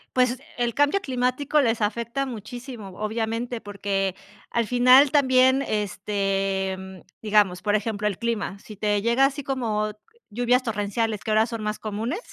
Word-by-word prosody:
Pues, 250 0 +2 0.2
el 240 -1 0
cambio 290 - +3
climático 260 -1 0
les 230 -3 +1
afecta 235 +5 -1
muchísimo, 240 -2 -8
obviamente, 225 +2 -2
porque 200 -2 -2 0.4
al 235 -2 0
final 250 +4 +6
también, 260 -2 +4
este, 195 -3 -1
mm, 190 -1 -10 0.2
digamos, 205 -4 +2
por 210 0 +1
ejemplo, 210 0 -1
el 200 -3 -2
clima, 220 -4 -2
si 215 - -11
te 205 0 0
llega 235 +5 +2
así 280 +1 -1
como 220 -6 -1 0.4
lluvias 245 +3 +2
torrenciales, 215 -1 -2
que 220 - -2
ahora 215 +1 +4
son 230 -2 -5
más 210 0 -3
comunes, 220 - -3
225 Hz, 150 wpm, -24 LUFS, 205-250 Hz, 0.4 s, final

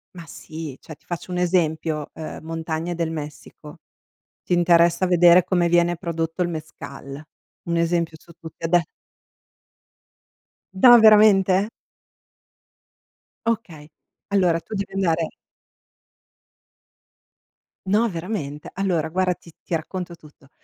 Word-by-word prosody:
Ma 170 -2 -9
sì, 155 -4 -9
cioè 155 - -11
ti - - -35
faccio 175 +1 -6
un 180 - -2
esempio, 160 -4 0
uhm, 160 - -7
montagne 165 +1 -4
del 165 -1 -2
Messico. 150 +1 -9 0.7
Ti - - -5
interessa 170 +1 +3
vedere 175 0 +6
come 175 -2 +1
viene 175 0 +2
prodotto 165 0 -3
il 175 - 0
Mezcal? 150 -3 -8 0.5
Un 170 - 0
esempio 170 -1 0
su 170 - -18
tutte, 165 0 -12
ade 170 0 +2 1.9
No, 240 +5 +8
veramente? 210 -3 +5 1.8
Okay. 170 -10 -3 0.4
Allora 180 -4 +2
tu 220 - -8
devi 200 0 -4
andare 170 -4 0 2.6
No 210 +5 +2
veramente? 165 -5 -5
Allora 175 -5 -1
guarda 185 +1 +1
ti 170 - -17
ti - - -7
racconto 175 +2 -5
tutto. 150 -4 -20
170 Hz, 115 wpm, -22 LUFS, 160-185 Hz, 2.6 s, No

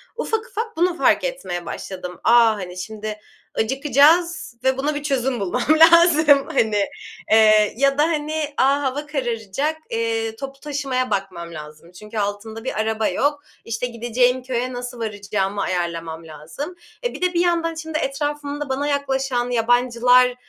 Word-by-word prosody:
ufak 445 0 -2
ufak 450 -2 -5
bunu 350 +1 +1
fark - - +3
etmeye - - -4
başladım. 180 0 -7
"A, 230 - +4 0.2
hani, 180 -3 -7
şimdi 215 +3 -6 0.4
acıkacağız 285 +5 +2
ve 265 0 +2
buna 290 +3 -1
bir 290 - -4
çözüm 265 -3 0
bulmam 195 -3 -1 0.3
lazım." 310 -5 +5
Hani, 210 -2 +2 0.5
eee, 215 -1 +5
ya 275 +1 +2
da, 295 - +4
hani, 305 -1 -1
"A, 280 +2 +3
hava 280 +2 -2
kararacak, 270 +1 -2
eee, 225 -1 -1
toplu 275 +2 -8
taşımaya 275 -4 -2
bakmam 185 -4 -3
lazım 155 +2 -11
çünkü 210 +5 -10
altım 205 +2 -3
da 225 - -8
bir 260 - -3
araba 220 0 0
yok, 290 +1 0 0.2
işte, 230 +2 -2
gideceğim 245 +2 0
köye 255 0 -2
nasıl 245 0 -6
varacağımı 205 -2 -2
ayarlamam 165 -2 -3
lazım." 165 - -8 0.3
E, 485 - -1
bir - - -9
de 365 0 +1
bir - - +3
yandan 335 -2 +1
şimdi 320 -1 -4
etrafımda 290 0 -3
bana 275 +2 -1
yaklaşan 270 -3 -1
yabancılar, 245 +1 +3
250 Hz, 150 wpm, -21 LUFS, 215-290 Hz, 0.5 s, lazım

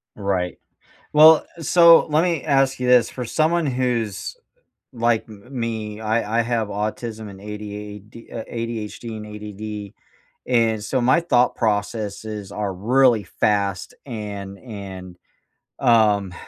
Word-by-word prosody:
Right. 95 -4 -2 0.5
Well, 155 +1 +7
uh, - - -9
so, 170 +2 +7
let 155 +2 +2
me 170 -5 0
ask 135 -3 +2
you 125 - -1
this. 125 -1 +5
For 125 - -6
someone 160 +6 +1
who's 125 - -2 0.6
like 120 -2 +1
m 105 -2 -13 0.2
me, 110 -2 -4
I 110 0 0
I - - +3
have 115 -2 -1
autism 110 +2 -4
and 95 -1 -11
ADAD 105 +1 -9
uh, 115 -2 -5
ADHD 115 -1 -5
and 105 0 -8 0.6
ADD, 100 - -17 0.5
and 115 -3 +2
so 130 +4 0
my 130 +7 +4
thought 125 -8 +2
processes 105 -1 -2
are 105 -2 -2
really 120 +2 +3
fast 100 -4 -1
and 100 -5 -6
and, 95 -6 -9 0.6
um, 105 -5 +3
110 Hz, 130 wpm, -22 LUFS, 105-125 Hz, 0.6 s, Well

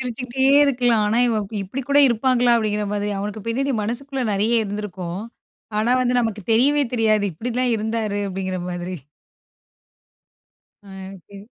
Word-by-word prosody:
சிரிச்சுக்கிட்டே 250 +1 -3 0.2
இருக்கலாம். 245 -5 +2
ஆனா 225 +3 +1
இவன் 215 -3 -1 0.2
இப்டி 230 +8 -5
கூட 280 +1 +4
இருப்பாங்களா? 245 +1 +2
அப்படிங்கிற 210 -2 -1
மாதிரி, 205 0 -1
அவனுக்கு 210 +1 -5
பின்னாடி 270 +4 0
மனசுக்குள்ள 260 +5 -3
நெறைய 220 +3 +2
இருந்திருக்கும். 195 -3 -5 0.6
ஆனா 225 +3 +1
வந்து 250 0 +1
நமக்கு 220 -3 -2
தெரியவே 285 +5 +3
தெரியாது, 215 -3 +2
இப்டில்லாம் 245 +7 -1
இருந்தாரு 215 -1 -2
அப்டிங்கிற 185 -1 -3
மாதிரி. 175 +1 -5 1.9
ஆ, - - -15 0.4
சரி. 200 0 -12
225 Hz, 130 wpm, -22 LUFS, 205-245 Hz, 1.9 s, கூட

